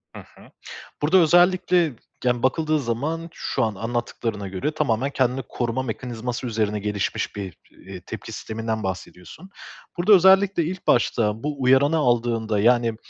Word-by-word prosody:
Hı - - -7
hı. - - -17 0.5
Burada 160 +6 +4
özellikle, 175 -1 +4 0.3
yani, 120 -1 0
bakıldığı 155 +4 +1
zaman 145 +7 -3
şu - - -2
an 110 -2 -1
anlattıklarına 115 -1 -3
göre 95 +10 -3
tamamen 135 -4 0
kendini 130 -1 0
koruma 120 +2 -2
mekanizması 120 0 -5
üzerine 105 -2 -1
gelişmiş 105 -1 -3
bir, 95 -5 -6
iii, 95 -2 -11
tepki - - -8
sisteminden 110 0 -4
bahsediyorsun. 95 - -7 0.5
Burada 180 +5 +4
özellikle 190 -1 +5
ilk 180 +3 -6
başta 110 -2 +1
bu 145 -2 -4
uyaranı 135 +5 +4
aldığında, 115 -5 +1
yani, 120 +1 +3
120 Hz, 135 wpm, -23 LUFS, 110-155 Hz, 0.5 s, özellikle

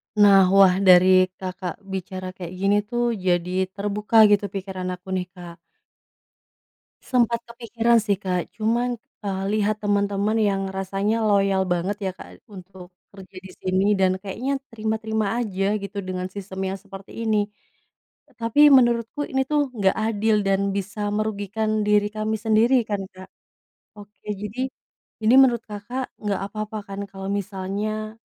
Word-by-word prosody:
Nah, 200 -2 +6
wah, 190 -1 +6
dari 185 -1 +6
Kakak 185 0 -6
bicara 185 -1 -6
kayak 180 -1 -8
gini, 195 +1 +2
tuh, 240 0 0
jadi 180 +1 +1
terbuka 210 +2 +3
gitu 205 0 +3
pikiran 190 -1 -5
aku, 190 +1 -12
nih, 185 -1 -2
Kak. 175 -2 -10 1.5
Sempat 235 -2 +1
kepikiran, 235 0 +1
sih, 205 -3 0
Kak. 180 -3 -2
Cuman, 235 +2 0 0.3
eee, 195 -1 -2
lihat 215 0 +1
teman-teman 205 +1 +1
yang 195 -2 +1
rasanya 195 +4 -1
loyal 195 -2 +2
banget, 180 +3 -1
ya, - - -4
Kak, - - -13
untuk 185 -2 -12 0.2
kerja 190 -1 -13
di 190 0 -10
sini, 185 +1 0
dan 185 0 +2
kayaknya 245 +8 -3
terima-terima 220 -1 -2
aja 205 -2 -1
gitu, 200 0 -8
dengan 185 -1 -4
sistem 195 -1 -7
yang - - -5
seperti 195 -1 -12
ini. 220 -1 +2 1.0
Tapi 235 +6 +5
menurutku 240 +2 +3
ini, 265 0 +1
tuh, 295 -1 +1
nggak 195 -4 +1
adil 220 0 +1
dan 195 0 +1
bisa 205 +1 -3
merugikan 215 0 -1
diri 210 0 +3
kami 215 0 -1
sendiri, 225 +3 +3
kan, 205 -2 -1
Kak. 185 0 -12 0.7
Oke, 205 +1 -16
jadi 210 +6 -4 0.5
ini 230 +4 +5
menurut 240 -4 +4
Kakak 220 +5 -6
nggak 205 -2 -2
apa-apa, 215 +1 -5
kan, 195 0 -7
kalau 195 0 -7
misalnya, 205 +2 -3
205 Hz, 140 wpm, -23 LUFS, 190-220 Hz, 1.5 s, Nah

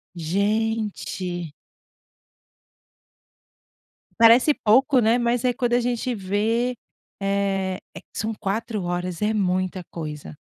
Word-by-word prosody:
Gente. 200 -2 -2 2.7
Parece 230 +5 +7
pouco, 260 +5 +4
né, 230 +1 +3
mas 240 +1 0
é 250 - +3
quando 240 0 -1
a 245 - +4
gente 245 0 -1
vê, 220 +5 0 0.5
eh 195 -1 0 0.2
eh, - - -8
são 220 +2 -3
4 215 +1 -3
horas, 175 0 -3
é 210 +1 +2
muita 185 -2 0
coisa. 150 - -7
210 Hz, 105 wpm, -23 LUFS, 185-235 Hz, 2.7 s, Parece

